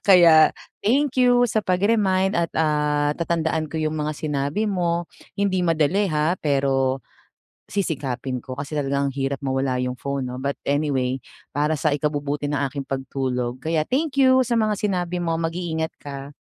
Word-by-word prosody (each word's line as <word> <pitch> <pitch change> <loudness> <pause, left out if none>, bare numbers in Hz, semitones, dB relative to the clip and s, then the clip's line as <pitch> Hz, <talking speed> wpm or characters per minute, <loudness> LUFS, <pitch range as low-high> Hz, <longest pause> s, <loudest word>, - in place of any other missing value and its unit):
Kaya, 170 -5 +7 0.3
thank 265 +2 +2
you 245 -1 +5
sa 215 - +1
pag 180 +1 +1
remind 195 -3 +2
at, 170 -1 0
ah, 150 -1 +1
tatandaan 160 -1 0
ko 155 - -14
yung 155 0 -1
mga 150 +1 -2
sinabi 150 +8 -1
mo, 175 -2 -1 0.2
hindi 190 -3 0
madali 165 +5 +2
ha 155 +2 0
pero, 135 -3 +1 0.6
sisikapin 135 - -2
ko 130 - -5
kasi 145 +3 -5
talaga 140 0 0
ang 140 - +1
hirap 135 +1 -3
mawala 130 -1 0
yung 125 0 -3
phone 140 -1 -3
'no. 125 - -6
But 140 +1 -2 0.2
anyway, 135 -3 0 0.3
para 150 +2 0
sa 155 +1 +1
ikabubuti 145 0 -1
ng 145 -1 -1
aking 140 0 -5
pagtulog 130 -2 -2
kaya 160 +2 0
thank 275 0 +1
you 260 -1 +5
sa 240 - -1
mga 215 -3 +1
sinabi 180 -4 -1
mo 170 -2 -1
mag-iingat 165 -1 -2
ka. 140 0 -8
155 Hz, 165 wpm, -23 LUFS, 140-180 Hz, 0.6 s, Kaya